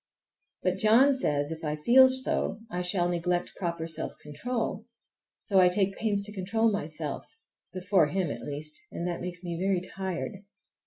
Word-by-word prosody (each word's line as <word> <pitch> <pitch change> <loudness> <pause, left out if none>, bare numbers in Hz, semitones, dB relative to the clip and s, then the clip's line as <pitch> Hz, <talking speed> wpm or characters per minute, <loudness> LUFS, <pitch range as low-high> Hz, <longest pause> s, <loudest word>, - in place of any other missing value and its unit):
But 185 0 +1
John 230 +8 +5
says 145 - 0
if 160 +1 -6
I 150 -1 -1
feel 250 +12 +6
so 260 -5 0
I 180 - -2
shall 180 0 0
neglect 175 0 -1
proper 170 -3 -2
self 165 -1 -3
control; 225 - -4 0.5
so 195 -3 +2
I 180 -1 +7
take 195 +1 +1
pains 205 -2 0
to 205 +1 -2
control 220 +4 +1
myself,—before 185 - -2
him, 175 -1 -1
at - - -6
least,—and 150 +4 -5
that 175 - -3
makes 180 0 -6
me 170 -1 -4
very 190 -1 +2
tired. 190 +2 -4
185 Hz, 155 wpm, -28 LUFS, 170-210 Hz, 0.5 s, I